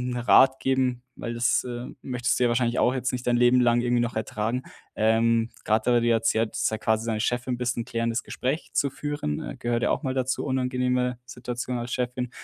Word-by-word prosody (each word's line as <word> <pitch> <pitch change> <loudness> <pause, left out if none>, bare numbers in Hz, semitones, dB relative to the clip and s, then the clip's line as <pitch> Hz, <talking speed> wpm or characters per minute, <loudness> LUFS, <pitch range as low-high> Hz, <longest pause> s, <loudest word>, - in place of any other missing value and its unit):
'n - - -2
Rat 130 +2 +5
geben, 130 -2 0
weil 115 - -4
das, 120 +2 +1
äh, 125 0 -5
möchtest 125 -2 -1
du 125 - +3
ja - - +4
wahrscheinlich 120 0 +1
auch 125 - +3
jetzt 130 0 -1
nicht 125 -1 -5
dein 120 - +3
Leben 125 +1 +5
lang 120 -1 +3
irgendwie 120 0 +1
noch 120 0 -2
ertragen. 110 +3 -2 0.3
Ähm, 115 +1 +2 0.2
grade 110 +3 +2
weil 120 - +5
du 120 - +1
ja 115 - +4
erzählt, 115 0 +1
dass - - -2
du 110 - +1
ja - - -8
quasi 110 +1 +1
seine 110 -2 -1
Chefin 120 +2 -1
bist 125 0 -1
'n 120 - -1
klärendes 115 -1 -1
Gespräch 135 +6 -3
zu 140 - +1
führen, 145 - -3
äh, - - -7
gehört 120 0 -1
ja - - +2
auch - - 0
mal 130 -2 -1
dazu. 130 -1 -1
Unangenehme 125 -1 0
Situation 125 0 -5
als 120 +1 -5
Chefin, 125 0 -2
120 Hz, 225 wpm, -26 LUFS, 115-125 Hz, 0.3 s, Rat